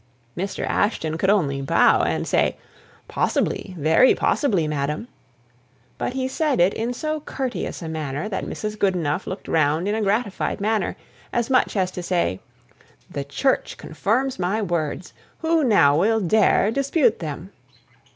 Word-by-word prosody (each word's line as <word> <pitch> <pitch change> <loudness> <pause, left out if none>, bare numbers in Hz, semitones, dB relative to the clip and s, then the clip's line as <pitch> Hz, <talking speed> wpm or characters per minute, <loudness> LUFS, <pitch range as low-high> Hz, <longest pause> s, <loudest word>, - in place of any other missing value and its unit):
Mr. 190 +2 -3
Ashton 160 -7 0
could 190 +4 0
only 145 -10 +2
bow, 135 - +4
and - - -1
say, - - +1 0.5
"Possibly, 185 - -1
very 160 - +4
possibly, 195 - +1
madam." 150 +7 -2 0.9
But - - -2
he 260 0 -1
said 290 +1 0
it 180 +3 +4
in 230 +2 -2
so 310 +5 -3
courteous 265 - -4
a - - -5
manner 155 +1 -3
that 195 -3 -3
Mrs. 215 0 -5
Goodenough 180 -4 0
looked 190 - -6
round 155 +3 +1
in 205 - 0
a 220 - -1
gratified 205 0 -1
way, 215 +1 0 0.4
as 240 +2 -1
much 255 - +2
as 185 -2 +1
to 180 - -6
say, 170 - 0 0.7
"The 140 - -3
Church 260 - -1
confirms 255 +3 -1
my 185 +4 0
words; 175 -3 -3 0.3
who 325 -1 +2
now 165 - +4
will 225 +5 +3
dare 210 +2 +3
dispute 275 - +2
them?" - - -6
195 Hz, 150 wpm, -23 LUFS, 160-240 Hz, 0.9 s, bow